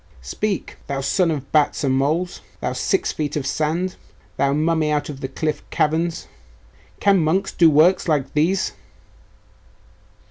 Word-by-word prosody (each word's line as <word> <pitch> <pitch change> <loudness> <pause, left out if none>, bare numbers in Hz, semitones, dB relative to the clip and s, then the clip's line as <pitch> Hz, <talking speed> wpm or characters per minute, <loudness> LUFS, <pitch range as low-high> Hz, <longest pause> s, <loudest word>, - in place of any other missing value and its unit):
Speak! 195 - -3
Thou 140 -1 -2
son 175 +5 +1
of 140 -4 -4
bats 150 -1 +2
and 135 -2 +2
moles 155 +7 0 0.2
thou - - -2
six 385 - 0
feet 150 -2 -3
of 145 -3 -2
sand 160 +6 -1 0.4
thou 140 0 +1
mummy 155 +1 +1
out 150 -1 -1
of 140 -2 -7
the 130 - -2
cliff 150 +2 -3
caverns! 160 +2 0 0.7
Can 200 -2 +4
monks 185 +5 +1
do 165 -2 +5
works 165 +6 +4
like 145 -4 0
these? 175 +6 +1
155 Hz, 145 wpm, -21 LUFS, 145-175 Hz, 0.7 s, do